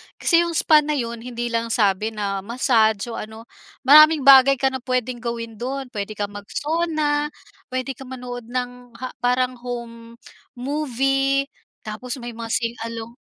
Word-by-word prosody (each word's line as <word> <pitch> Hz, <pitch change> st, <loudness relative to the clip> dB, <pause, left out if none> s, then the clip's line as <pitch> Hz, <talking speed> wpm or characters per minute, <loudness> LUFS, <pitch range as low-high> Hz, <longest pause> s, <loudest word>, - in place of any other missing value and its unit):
Kasi 335 Hz, -, +3 dB
'yong 340 Hz, -1 st, 0 dB
spa 310 Hz, -1 st, +5 dB
na 300 Hz, 0 st, -1 dB
'yon, 235 Hz, -3 st, -3 dB
hindi 240 Hz, 0 st, -5 dB
lang 230 Hz, 0 st, -1 dB
sabi 215 Hz, -1 st, +1 dB
na 200 Hz, -2 st, -2 dB
massage 225 Hz, 0 st, +1 dB
o -, -, -5 dB
ano, 220 Hz, +1 st, -9 dB, 0.4 s
maraming 305 Hz, +2 st, +7 dB
bagay 275 Hz, 0 st, +8 dB
ka 265 Hz, +1 st, +1 dB
na 260 Hz, -, -4 dB
puwedeng 255 Hz, -1 st, -2 dB
gawin 230 Hz, -2 st, -5 dB
do'n. 265 Hz, +1 st, -4 dB
Puwede 210 Hz, -1 st, -5 dB
kang 205 Hz, 0 st, -3 dB
mag-sauna, 295 Hz, +7 st, -1 dB, 0.4 s
puwede 255 Hz, +1 st, -3 dB
ka 265 Hz, 0 st, -10 dB
manood 245 Hz, -2 st, -7 dB
ng 245 Hz, -1 st, -5 dB
ha 255 Hz, -, -4 dB
parang 250 Hz, 0 st, 0 dB
home 235 Hz, -1 st, -7 dB, 0.4 s
movie, 270 Hz, 0 st, 0 dB, 0.4 s
tapos 220 Hz, +4 st, -5 dB
may 240 Hz, -, -5 dB
mga 230 Hz, 0 st, -7 dB
sing 230 Hz, -1 st, 0 dB, 0.2 s
along 230 Hz, +2 st, -8 dB
245 Hz, 160 wpm, -22 LUFS, 230-270 Hz, 0.4 s, bagay